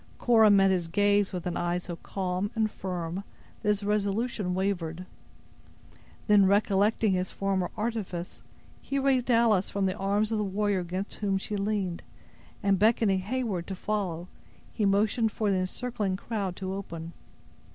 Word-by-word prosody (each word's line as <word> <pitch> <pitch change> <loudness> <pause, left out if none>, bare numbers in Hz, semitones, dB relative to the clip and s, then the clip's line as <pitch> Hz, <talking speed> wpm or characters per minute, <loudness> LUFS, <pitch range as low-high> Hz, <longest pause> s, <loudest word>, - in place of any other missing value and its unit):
Cora 225 -3 +5
met 195 -1 +5
his 180 -3 0
gaze 205 +2 +2
with 180 -3 -5
an 175 -1 -2
eye 175 0 0
so 175 -1 -6
calm 185 +2 -3
and 220 -1 +1
firm, 180 0 -4 0.4
that - - -5
his 205 -1 +1
resolution 205 -1 0
wavered. 185 -3 -2 1.2
Then, 205 -2 +5
recollecting 205 +2 +3
his 185 0 -1
former 195 -2 -1
artifice, 210 -6 -3 0.4
he 275 - -3
raised 265 -2 +2
Alice 230 -5 +3
from 200 -1 -1
the 185 0 0
arms 205 +2 0
of 220 - 0
the - - +1
warrior 200 0 0
against 185 +3 -4
whom 195 -2 +1
she 205 +2 -4
leaned, 200 -3 -1 0.6
and 195 -2 +3
beckoning 215 -2 +3
Heyward 205 -3 -2
to 195 - -4
follow, 185 -4 -2 0.5
he 210 - 0
motioned 215 +3 +2
for 210 -1 0
the 190 - +2
encircling 195 +1 -2
crowd 200 -4 -3
to 190 0 -4
open. 170 -4 -6
200 Hz, 155 wpm, -28 LUFS, 185-215 Hz, 1.2 s, Cora